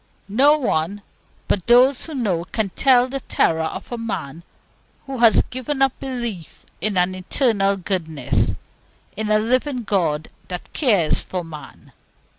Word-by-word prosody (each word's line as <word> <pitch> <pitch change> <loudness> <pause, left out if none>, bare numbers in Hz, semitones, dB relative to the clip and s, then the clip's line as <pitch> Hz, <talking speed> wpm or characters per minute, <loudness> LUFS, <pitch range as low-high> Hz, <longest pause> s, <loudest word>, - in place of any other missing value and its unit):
No 275 +9 +5
one 200 - -1 0.4
but 190 - -1
those 250 +4 +4
who 315 - -7
know 195 -10 -1
can 200 +3 -2
tell 255 +1 +4
the 270 +1 -4
terror 160 -9 +1
of - - -6
a 240 - -4
man 170 -9 -5 0.6
who 270 -2 -6
has 230 -4 +6
given 260 +3 -3
up 270 -1 +3
belief 240 - -6 0.2
in 205 0 -1
an 180 +1 +2
Eternal 200 +1 +1
Goodness, 160 -8 -1 0.6
in 215 +1 -3
a 215 - +5
living 250 +3 0
God 165 -7 0 0.2
that 180 -1 -7
cares 205 - +2
for 180 -1 -5
man. 155 -2 -12
215 Hz, 145 wpm, -21 LUFS, 180-255 Hz, 0.6 s, has